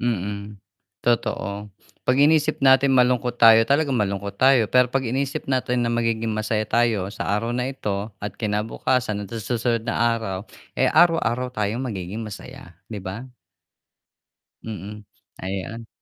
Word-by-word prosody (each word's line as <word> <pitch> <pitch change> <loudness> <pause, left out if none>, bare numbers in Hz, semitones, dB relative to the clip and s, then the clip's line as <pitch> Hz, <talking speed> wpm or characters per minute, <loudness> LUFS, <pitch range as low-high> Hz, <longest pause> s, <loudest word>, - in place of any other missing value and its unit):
Mm, 105 -2 -3 0.4
totoo 105 -3 -1 0.3
pag 130 +2 +3
inisip 150 0 +3
natin 135 0 +5
malungkot 125 -1 +2
tayo 115 -1 +8
talaga 140 +2 +2
malungkot 100 -4 -1
tayo, 130 -5 +4
pero 125 0 +5
pag 135 - +1
iniisip 135 +3 -2
natin 125 -1 0
na 115 - 0
magiging 115 -1 0
masaya 110 0 -1
tayo 110 -4 +1
sa - - -5
araw 115 +3 -1
na 125 +1 -1
ito 105 -6 -4
at 105 - -3
kinabukasan 105 0 -1
at - - -17
sa 115 - -4
susunod 115 -1 -1
na 115 +1 +1
araw, 100 -3 -5 0.3
eh - - +4
araw-araw 130 -8 +3
tayong 105 +1 -2
magiging 105 -3 -5
masaya 95 -5 -10
'di 105 - -5
ba? 100 +7 -6 1.4
Mm, 105 -1 -7 0.4
ayan. 100 +5 -5
115 Hz, 140 wpm, -23 LUFS, 105-125 Hz, 1.4 s, tayo